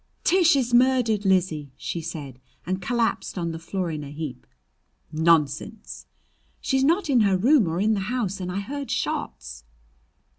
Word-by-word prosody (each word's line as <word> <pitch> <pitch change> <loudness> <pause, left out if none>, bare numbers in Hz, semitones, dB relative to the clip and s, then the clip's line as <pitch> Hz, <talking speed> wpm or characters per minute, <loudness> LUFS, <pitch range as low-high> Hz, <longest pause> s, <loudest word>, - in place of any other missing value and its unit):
"Tish 350 -3 +4
is 250 -3 0
murdered, 240 -4 +3
Lizzie!" 170 -7 +1
she 170 - -4
said, 140 -5 -7 0.3
and 185 +2 -2
collapsed 235 0 -1
on 170 -2 -2
the 165 - -6
floor 180 +1 -3
in 150 -1 -5
a 140 - -8
heap. 145 -4 -7 0.6
"Nonsense!" 160 - 0 0.5
"She's 265 -2 0
not 335 +7 +2
in 265 -4 +3
her 195 -3 +3
room 240 - +4
or 165 +2 -2
in 215 +3 +2
the 205 - 0
house, 220 -7 -2
and 180 -1 -4
I 195 +2 -2
heard 280 +6 -6
shots!" 60 0 -4
190 Hz, 160 wpm, -24 LUFS, 160-245 Hz, 0.6 s, Tish